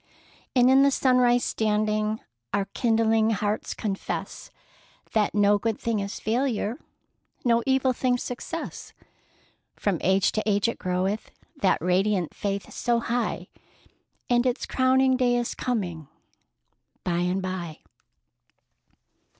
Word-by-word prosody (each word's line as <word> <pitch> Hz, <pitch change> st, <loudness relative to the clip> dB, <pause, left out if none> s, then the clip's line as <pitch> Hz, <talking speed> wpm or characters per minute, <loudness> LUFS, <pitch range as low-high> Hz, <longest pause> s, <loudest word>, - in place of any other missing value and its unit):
And 250 Hz, -1 st, +5 dB
in 265 Hz, +1 st, +6 dB
the 280 Hz, -, +6 dB
sunrise 250 Hz, -2 st, +3 dB
standing, 215 Hz, 0 st, 0 dB, 0.3 s
Our 200 Hz, -1 st, +1 dB
kindling 225 Hz, -2 st, +2 dB
hearts 210 Hz, 0 st, -1 dB
confess 200 Hz, -3 st, -4 dB, 0.6 s
That 210 Hz, -2 st, +1 dB
'no 205 Hz, 0 st, +4 dB
good 225 Hz, 0 st, -2 dB
thing 230 Hz, -2 st, -1 dB
is 200 Hz, 0 st, -4 dB
failure. 235 Hz, +1 st, -1 dB, 0.7 s
No 235 Hz, -1 st, +4 dB
evil 265 Hz, -1 st, +3 dB
thing 250 Hz, 0 st, +1 dB
success!' 250 Hz, +7 st, -6 dB, 0.8 s
From 195 Hz, -6 st, -1 dB
age 190 Hz, +1 st, +3 dB
to 215 Hz, -, -1 dB
age 205 Hz, +1 st, +2 dB
it 230 Hz, -, -3 dB
groweth, 185 Hz, +3 st, -1 dB, 0.3 s
That 190 Hz, -, +2 dB
radiant 185 Hz, 0 st, +1 dB
faith 200 Hz, -1 st, -4 dB
so 240 Hz, -1 st, +1 dB
high, 240 Hz, +1 st, -2 dB, 0.8 s
And 240 Hz, +1 st, +3 dB
its 250 Hz, +1 st, -1 dB
crowning 260 Hz, 0 st, +3 dB
day 245 Hz, -1 st, +2 dB
is 240 Hz, -1 st, -2 dB
coming 175 Hz, -, -3 dB, 1.0 s
by 175 Hz, -1 st, 0 dB
and 180 Hz, +2 st, 0 dB
by!" 185 Hz, -4 st, -5 dB
220 Hz, 120 wpm, -26 LUFS, 195-245 Hz, 1.0 s, in